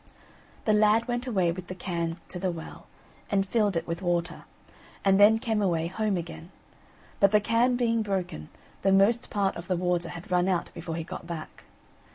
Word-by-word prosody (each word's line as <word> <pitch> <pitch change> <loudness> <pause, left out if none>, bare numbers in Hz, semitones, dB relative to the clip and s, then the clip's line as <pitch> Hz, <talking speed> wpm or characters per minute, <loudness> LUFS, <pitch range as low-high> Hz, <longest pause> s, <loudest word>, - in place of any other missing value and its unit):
The 215 - +3
lad 215 +2 +4
went 245 +1 -2
away 190 -8 +2
with 180 +1 -7
the 185 - -6
can 170 -2 -3
to 180 - -6
the 185 +1 0
well, 165 -2 -8 0.4
and 195 -1 +1
filled 205 -3 +1
it - - -2
with 165 +1 -4
water, 175 -2 -1 0.6
and 195 0 +5
then 210 +2 +7
came 225 -2 -1
away 170 -5 +1
home 200 +3 -1
again; 170 0 -7 0.7
but 200 - +6
the 210 - +5
can 230 +4 +2
being 230 -2 +1
broken, 185 - -3 0.3
the 195 - +3
most 205 +5 +3
part 200 -2 0
of 170 +1 -8
the 185 - 0
water 175 -1 0
had 175 +1 -9
run 180 0 +3
out 185 -3 -1
before 165 -1 -5
he 165 - -3
got 170 - -8
back. 165 -2 -8
190 Hz, 195 wpm, -27 LUFS, 170-210 Hz, 0.7 s, then